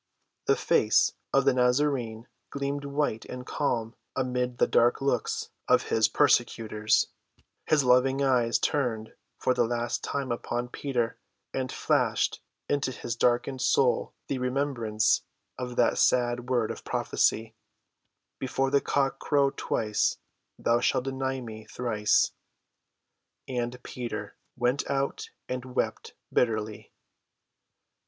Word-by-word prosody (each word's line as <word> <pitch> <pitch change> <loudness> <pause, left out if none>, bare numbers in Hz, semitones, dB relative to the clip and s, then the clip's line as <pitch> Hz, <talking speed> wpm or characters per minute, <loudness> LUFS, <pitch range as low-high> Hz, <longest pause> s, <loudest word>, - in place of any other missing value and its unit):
The - - +5
face - - +3 0.2
of 135 -1 +3
the 135 - +5
Nazarene 125 -3 +1 0.2
gleamed 140 0 -3
white 140 -5 -1
and 125 0 -7
calm 115 -7 -1 0.2
amid 125 -1 -1
the - - +4
dark 120 +1 +3
looks 140 0 -1 0.2
of - - +3
his - - +4
persecutors; 110 -1 +2 0.6
his 150 -2 +4
loving 130 +2 +4
eyes 120 -3 +3
turned 115 -5 -1 0.2
for 130 - +1
the 125 -1 +2
last 120 0 -2
time 140 -3 -2
upon 120 +1 -3
Peter 120 -3 -2 0.3
and 130 -1 -2
flashed - - +1 0.3
into 140 -2 0
his 120 -2 -4
darkened 125 +2 +1
soul 130 0 +2
the 135 - -3
remembrance 125 -4 +1 0.4
of 125 -1 -4
that - - +3
sad 125 0 +2
word 120 -4 +1
of - - -8
prophecy: 110 0 0 0.9
"Before 135 +1 -1
the 140 0 +4
cock 135 -1 0
crow 140 -2 +2
twice, 105 -5 0 0.4
thou 115 0 +2
shalt 125 - +1
deny 135 0 -2
me 110 -2 -8
thrice." 110 -2 +1 1.2
And 125 -1 -2
Peter 120 -2 -5 0.2
went 125 +3 0
out 140 0 -1 0.2
and 125 0 -3
wept - - -2 0.2
bitterly. 110 -3 0
125 Hz, 120 wpm, -28 LUFS, 120-135 Hz, 1.2 s, The